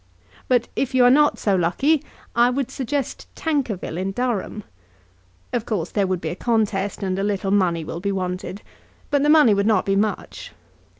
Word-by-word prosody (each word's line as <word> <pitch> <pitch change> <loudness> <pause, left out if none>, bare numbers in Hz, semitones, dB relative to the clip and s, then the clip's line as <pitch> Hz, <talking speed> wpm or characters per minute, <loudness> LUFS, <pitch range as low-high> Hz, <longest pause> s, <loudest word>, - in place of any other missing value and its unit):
But 245 -2 +2
if 265 -1 -1
you 255 - +5
are 245 - +7
not 295 +2 +4
so 200 -2 +1
lucky 265 - +2 0.3
I 240 +1 +5
would 260 0 -2
suggest 275 +1 -3
Tankerville 250 - -2
in 190 +1 -2
Durham. 220 -3 -2 0.9
Of 235 -2 -2
course 180 -7 -2
there 200 -2 +1
would 185 -2 -1
be - - -3
a - - -4
contest, 205 -2 -1
and 190 0 -1
a - - -1
little 200 -1 -1
money 180 -5 +2
will 165 - -6
be 200 +2 -2
wanted; 185 +1 -4 0.5
but 285 -1 +3
the 295 - +2
money 300 -8 +6
would 200 +1 +1
not 210 -4 +3
be 195 - +1
much. 210 +1 -2
210 Hz, 185 wpm, -22 LUFS, 190-250 Hz, 0.9 s, are